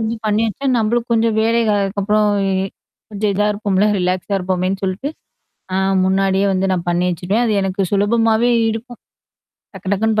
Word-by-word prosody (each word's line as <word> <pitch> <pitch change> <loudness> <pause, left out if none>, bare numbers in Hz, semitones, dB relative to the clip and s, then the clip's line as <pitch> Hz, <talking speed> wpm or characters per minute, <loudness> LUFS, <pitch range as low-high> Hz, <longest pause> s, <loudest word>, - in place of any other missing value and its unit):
வந்து 225 +1 -1
பண்ணி 210 +1 +1
வச்சா, 250 +6 -4
நம்மளுக்கு 235 +2 0
கொஞ்சம் 225 -1 +2
வேலைகள் 225 -2 +2
அதுக்கப்புறம் 210 +2 +1 0.8
கொஞ்சம் 210 0 -1
இதா 210 +1 +1
இருக்கும்ல. 200 -1 +1
ரிலாக்ஸா 185 +2 -1
இருப்போமேன்னு 185 +1 -1
சொல்லிட்டு 190 +10 -2 0.6
ஆ - - +1 0.3
முன்னாடியே 195 +1 +2
வந்து 190 +1 0
நான் 175 -2 -2
பண்ணி 175 +1 +1
வச்சுருவேன். 185 +7 -1
அது 225 - +1
எனக்கு 195 +1 -1
சுலபமாவே 225 +3 +2 0.2
இருக்கும். 235 +2 -7 0.8
டக்கு 195 +1 -11
டக்கக்குன்னு 215 +2 +1
205 Hz, 145 wpm, -18 LUFS, 190-225 Hz, 0.8 s, கொஞ்சம்